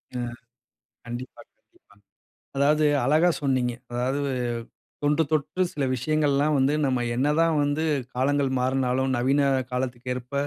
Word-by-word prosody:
ம், 120 Hz, -1 st, -3 dB, 0.7 s
கண்டிப்பா 120 Hz, +2 st, -7 dB, 0.2 s
கண்டிப்பா. -, -, -27 dB, 0.6 s
அதாவது 150 Hz, +2 st, +3 dB, 0.2 s
அழகா 155 Hz, +6 st, +4 dB
சொன்னீங்க. 130 Hz, -3 st, +1 dB, 0.2 s
அதாவது 130 Hz, +4 st, -1 dB, 0.8 s
தொன்று 145 Hz, +2 st, +3 dB
தொட்டு 155 Hz, +4 st, -1 dB
சில 140 Hz, -2 st, -2 dB
விஷயங்கள்லாம் 150 Hz, +2 st, +1 dB
வந்து 135 Hz, +3 st, +2 dB
நம்ம, 130 Hz, -2 st, 0 dB, 0.2 s
என்னதான் 150 Hz, +4 st, +2 dB
வந்து 145 Hz, +2 st, 0 dB, 0.3 s
காலங்கள் 140 Hz, +2 st, +1 dB
மாறுனாலும், 130 Hz, 0 st, +1 dB
நவீன 135 Hz, +4 st, +2 dB, 0.3 s
காலத்துக்கு 125 Hz, 0 st, -3 dB
ஏற்ப 125 Hz, +2 st, -8 dB
135 Hz, 115 wpm, -25 LUFS, 125-150 Hz, 0.8 s, அழகா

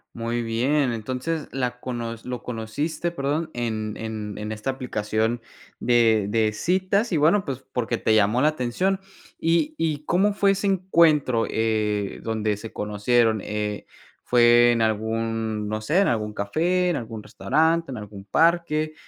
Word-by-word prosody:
Muy 115 Hz, +1 st, -2 dB
bien, 125 Hz, +4 st, +1 dB
entonces 130 Hz, +8 st, -3 dB
la 125 Hz, -2 st, -2 dB
cono 120 Hz, -2 st, -4 dB
lo 125 Hz, -1 st, -5 dB
conociste, 145 Hz, +9 st, -3 dB
perdón, 155 Hz, +1 st, -2 dB
en 110 Hz, -3 st, -3 dB
en 110 Hz, -2 st, -5 dB
en 105 Hz, +1 st, -5 dB
esta 110 Hz, +4 st, -4 dB
aplicación 110 Hz, -2 st, -1 dB, 0.4 s
de 115 Hz, -3 st, +3 dB
de 110 Hz, 0 st, +2 dB
citas, 185 Hz, -, 0 dB
y -, -, +3 dB
bueno, 170 Hz, +7 st, +3 dB
pues, 135 Hz, -2 st, -5 dB
porque 125 Hz, -3 st, -1 dB
te 110 Hz, -, +1 dB
llamó 110 Hz, +4 st, +3 dB
la 155 Hz, -, +5 dB
atención. 155 Hz, +8 st, -1 dB, 0.4 s
¿Y 170 Hz, -, +1 dB
y 150 Hz, -2 st, -1 dB
cómo 200 Hz, +6 st, +2 dB
fue 200 Hz, -1 st, +3 dB
ese 195 Hz, +1 st, -1 dB
encuentro, 165 Hz, -10 st, +3 dB
eh, 105 Hz, -2 st, -1 dB
donde 110 Hz, -2 st, -1 dB
se 115 Hz, +1 st, -9 dB
conocieron? 110 Hz, +2 st, +1 dB
Eh, 105 Hz, -1 st, -3 dB, 0.4 s
¿fue 120 Hz, 0 st, +5 dB
en 115 Hz, -, 0 dB
algún, 110 Hz, 0 st, -1 dB
no 110 Hz, 0 st, -2 dB
sé, 150 Hz, -, +1 dB
en 200 Hz, -, +3 dB
algún 105 Hz, -2 st, -1 dB
café, 175 Hz, -, 0 dB
en 170 Hz, -, 0 dB
algún 110 Hz, -2 st, -6 dB
restaurante, 160 Hz, +8 st, +1 dB
en 125 Hz, -, -5 dB
algún 100 Hz, -2 st, -9 dB
parque? 155 Hz, -, +2 dB
120 Hz, 155 wpm, -24 LUFS, 110-155 Hz, 0.4 s, la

